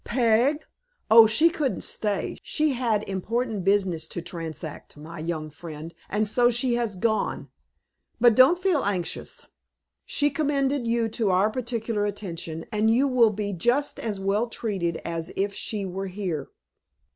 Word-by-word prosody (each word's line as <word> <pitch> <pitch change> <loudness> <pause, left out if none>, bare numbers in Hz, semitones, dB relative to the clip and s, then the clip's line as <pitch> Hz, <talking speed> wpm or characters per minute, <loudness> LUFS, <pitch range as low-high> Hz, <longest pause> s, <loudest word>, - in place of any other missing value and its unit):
"Peg? 245 +6 +2 0.5
Oh, 225 0 +9
she 310 +11 +4
couldn't 295 -6 -2
stay. 210 -2 -1
She 305 -2 0
had 230 -4 0
important 215 +2 -2
business 195 -4 +1
to - - -5
transact, 165 -3 -6
my 155 +2 -9
young 155 -1 -4
friend, 160 +1 -9 0.2
and 210 +1 0
so 240 +3 +4
she 245 +1 +1
has 235 -4 -1
gone; 220 +3 -1 0.7
but 240 0 +6
don't 260 +9 +6
feel 360 -5 +1
anxious. 190 -4 -3 0.6
She 290 0 +1
commended 280 -3 0
you 230 0 +1
to 220 -1 0
our 190 +4 +3
particular 230 -3 -2
attention, 170 -5 -5
and 215 +1 +2
you 250 +5 +3
will 250 -4 +4
be 205 -1 -3
just 240 - +1
as 210 -4 -3
well 200 +4 0
treated 195 -8 -2
as 165 -1 -3
if 200 +1 -1
she 205 0 -4
were 190 +1 -4
here." 180 -7 -4
215 Hz, 150 wpm, -25 LUFS, 185-240 Hz, 0.7 s, Oh